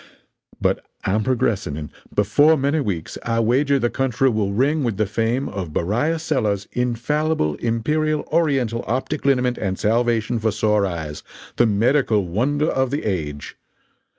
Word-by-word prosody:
But -, -, 0 dB, 0.2 s
I'm 105 Hz, +3 st, +1 dB
progressing, 115 Hz, -, 0 dB
and 75 Hz, -1 st, -7 dB, 0.2 s
before 145 Hz, +10 st, +4 dB
many 140 Hz, +3 st, +1 dB
weeks 95 Hz, -, -3 dB
I 115 Hz, 0 st, -1 dB
wager 135 Hz, +5 st, +2 dB
the 120 Hz, -2 st, 0 dB
country 135 Hz, 0 st, +1 dB
will 105 Hz, -4 st, 0 dB
ring 140 Hz, +8 st, +1 dB
with 115 Hz, -6 st, -1 dB
the 110 Hz, -, +2 dB
fame 115 Hz, +6 st, -1 dB
of 90 Hz, -6 st, -5 dB
Beriah 120 Hz, -, 0 dB
Sellers' 115 Hz, -11 st, -1 dB
Infallible 125 Hz, -, 0 dB
Imperial 150 Hz, +7 st, 0 dB
Oriental 135 Hz, -8 st, +1 dB
Optic 135 Hz, +5 st, -2 dB
Liniment 125 Hz, -2 st, +2 dB
and 95 Hz, -2 st, -2 dB
Salvation 115 Hz, +1 st, +1 dB
for 110 Hz, 0 st, +1 dB
Sore 105 Hz, -1 st, +1 dB
Eyes 80 Hz, -4 st, -5 dB, 0.4 s
the 120 Hz, -, +4 dB
Medical 110 Hz, 0 st, +2 dB
Wonder 135 Hz, -, 0 dB
of 130 Hz, -1 st, +1 dB
the 145 Hz, +3 st, -2 dB
Age! 75 Hz, -8 st, -3 dB
115 Hz, 150 wpm, -21 LUFS, 105-135 Hz, 0.4 s, before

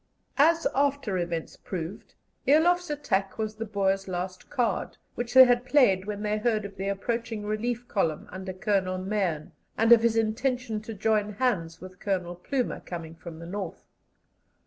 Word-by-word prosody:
As 330 Hz, +3 st, +5 dB
after 275 Hz, -8 st, +1 dB
events 170 Hz, -2 st, -3 dB
proved, 175 Hz, 0 st, -6 dB, 0.3 s
Eloff's 350 Hz, +5 st, +4 dB
attack 200 Hz, -10 st, -1 dB
was 215 Hz, -1 st, -3 dB
the 225 Hz, 0 st, -4 dB
Boers' 195 Hz, -1 st, 0 dB
last 185 Hz, 0 st, -5 dB
card, 245 Hz, -2 st, -1 dB, 0.2 s
which 240 Hz, +1 st, -4 dB
they 260 Hz, -, +12 dB
had 245 Hz, -1 st, +3 dB
played 250 Hz, -8 st, +4 dB
when 210 Hz, 0 st, -4 dB
they 210 Hz, 0 st, 0 dB
heard 215 Hz, -2 st, +1 dB
of 200 Hz, -1 st, -8 dB
the 195 Hz, +1 st, -4 dB
approaching 225 Hz, +2 st, -2 dB
relief 235 Hz, +3 st, -2 dB
column 165 Hz, -7 st, -1 dB
under 190 Hz, +1 st, -5 dB
Colonel 185 Hz, -1 st, 0 dB
Mahon, 185 Hz, -5 st, -2 dB, 0.3 s
and 225 Hz, +1 st, +3 dB
of 235 Hz, -1 st, +9 dB
his 230 Hz, -1 st, +2 dB
intention 225 Hz, 0 st, 0 dB
to 220 Hz, +1 st, -7 dB
join 210 Hz, 0 st, +1 dB
hands 195 Hz, -9 st, -1 dB
with 185 Hz, 0 st, -11 dB
Colonel 185 Hz, -4 st, -1 dB
Plumer, 245 Hz, +9 st, -2 dB
coming 165 Hz, -2 st, -7 dB
from 165 Hz, 0 st, -10 dB
the 165 Hz, -, -9 dB
North. 190 Hz, 0 st, -6 dB
210 Hz, 165 wpm, -27 LUFS, 185-240 Hz, 0.3 s, they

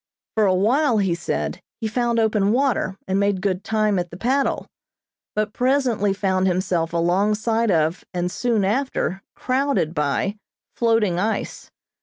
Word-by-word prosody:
For 215 Hz, -2 st, +3 dB
a 185 Hz, -, +3 dB
while, 240 Hz, +6 st, +2 dB
he 195 Hz, -4 st, +1 dB
said, 75 Hz, -, -3 dB, 0.2 s
he 220 Hz, -, -2 dB
found 235 Hz, +1 st, 0 dB
open 215 Hz, -3 st, +2 dB
water, 240 Hz, -7 st, +1 dB
and 190 Hz, +1 st, +1 dB
made 200 Hz, -1 st, +1 dB
good 190 Hz, -1 st, -1 dB
time 215 Hz, -2 st, +1 dB
at 175 Hz, 0 st, -3 dB
the 170 Hz, -, -10 dB
paddle, 265 Hz, +7 st, 0 dB, 0.7 s
but 215 Hz, 0 st, -1 dB
presently 250 Hz, -6 st, +1 dB
found 190 Hz, -1 st, +1 dB
himself 180 Hz, -2 st, 0 dB
alongside 210 Hz, +7 st, +1 dB
of 165 Hz, -1 st, +1 dB
and 180 Hz, 0 st, -2 dB
soon 225 Hz, 0 st, 0 dB
after 215 Hz, -3 st, -1 dB
crowded 260 Hz, -, 0 dB
by 150 Hz, +7 st, -1 dB, 0.4 s
floating 225 Hz, -6 st, +2 dB
ice. 220 Hz, +4 st, -3 dB
205 Hz, 145 wpm, -22 LUFS, 185-230 Hz, 0.7 s, For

